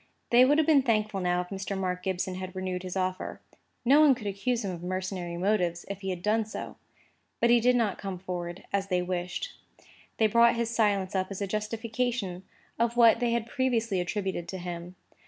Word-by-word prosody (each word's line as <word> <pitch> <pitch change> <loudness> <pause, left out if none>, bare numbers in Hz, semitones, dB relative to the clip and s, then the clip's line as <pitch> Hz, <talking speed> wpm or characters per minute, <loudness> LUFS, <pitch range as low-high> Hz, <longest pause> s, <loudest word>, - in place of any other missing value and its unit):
They 245 +1 +7
would 290 +3 +4
have 315 - +4
been 295 -3 +5
thankful 215 -5 0
now 180 -1 +1
if 180 - -8
Mr. 195 0 -4
Mark 180 -1 -2
Gibson 190 0 -2
had 185 0 -6
renewed 185 -1 -3
his 185 0 -5
offer. 185 0 -2 0.5
No 280 +5 +6
one 290 -4 +6
could 225 - -10
accuse 210 +4 -1
him 190 - -2
of 175 -2 -7
mercenary 185 -1 -3
motives 180 -3 0
if 200 0 -5
he 190 - -3
had 180 -1 -4
done 220 +2 +2
so. 215 - -7 0.6
Because 235 0 +4
he 240 - +6
did 250 +2 +3
not 225 -5 +1
come 195 -2 -4
forward, 175 -1 -5
as 195 0 0
they 180 -2 +1
wished, 180 - -3 0.6
they 220 - +4
brought 235 +2 +5
his 235 -1 -1
silence 205 -5 +1
up 185 -1 0
as 195 - -5
a 200 - -1
justification 215 -1 -2 0.4
of 235 0 +1
what 230 -1 +6
they 240 0 +1
had 235 -1 0
previously 230 -6 0
attributed 185 -1 -3
to 190 - -5
him. 175 0 -6
195 Hz, 205 wpm, -28 LUFS, 185-230 Hz, 0.6 s, They